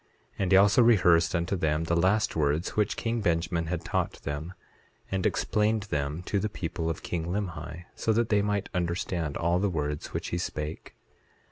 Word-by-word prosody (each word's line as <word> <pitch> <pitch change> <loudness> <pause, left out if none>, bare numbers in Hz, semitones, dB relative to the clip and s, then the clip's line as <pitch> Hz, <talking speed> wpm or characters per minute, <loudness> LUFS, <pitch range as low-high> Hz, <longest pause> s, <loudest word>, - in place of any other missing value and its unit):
8:3 - - -32
And 95 -2 0
he 95 - +8
also 100 +5 +6
rehearsed 90 -7 +5
unto 85 +3 0
them 80 -2 0
the 85 +1 0
last 95 +5 +2
words 75 +2 +1
which 105 -1 +1
king 115 0 -1
Benjamin 85 -2 0
had 85 0 -3
taught - - -1
them, 75 +6 -4 0.6
and 95 -1 +1
explained 105 0 +1
them 75 -2 -3
to 100 - 0
the 105 - -1
people 85 -3 -3
of 80 - -4
king 85 -2 -3
Limhi, 85 -3 -4
so 110 - 0
that 115 +1 +1
they 105 -1 +3
might 100 -1 -1
understand 85 -3 -2
all 85 +2 +1
the 100 +1 +1
words 75 -3 -2
which - - -4
he 85 - -2
spake. 75 -2 -5
85 Hz, 190 wpm, -28 LUFS, 80-100 Hz, 0.6 s, he